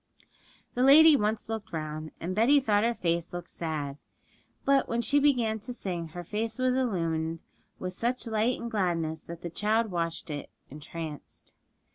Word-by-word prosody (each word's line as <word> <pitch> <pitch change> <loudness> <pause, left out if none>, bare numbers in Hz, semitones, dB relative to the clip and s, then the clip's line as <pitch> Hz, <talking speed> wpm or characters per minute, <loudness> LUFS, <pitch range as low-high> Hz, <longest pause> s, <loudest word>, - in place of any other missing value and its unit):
The 245 - -1
lady 300 +4 +9
once 215 -3 0
looked 220 -3 -5
round; 155 -1 -4
and 175 +3 -3
Betty 240 +8 +5
thought 210 -5 +2
her 235 +1 +1
face 170 -2 -1
looked 175 -1 -7
sad; 150 -4 -4 0.7
but 275 -1 +3
when 230 - 0
she 285 +6 +3
began 245 -7 +2
to 235 +4 -6
sing 175 -7 -4
her 175 +2 -7
face 220 +5 -3
was 255 0 +2
illumined 165 -10 -1 0.3
with 180 0 -4
such 240 +6 -1
light 225 +2 +1
and 235 0 -5
gladness 165 -6 -1
that 170 0 -9
the 170 - -4
child 215 +4 +1
watched 165 -2 -3
it 145 -1 -5 0.2
entranced. 150 +1 -7
205 Hz, 165 wpm, -29 LUFS, 165-235 Hz, 0.7 s, lady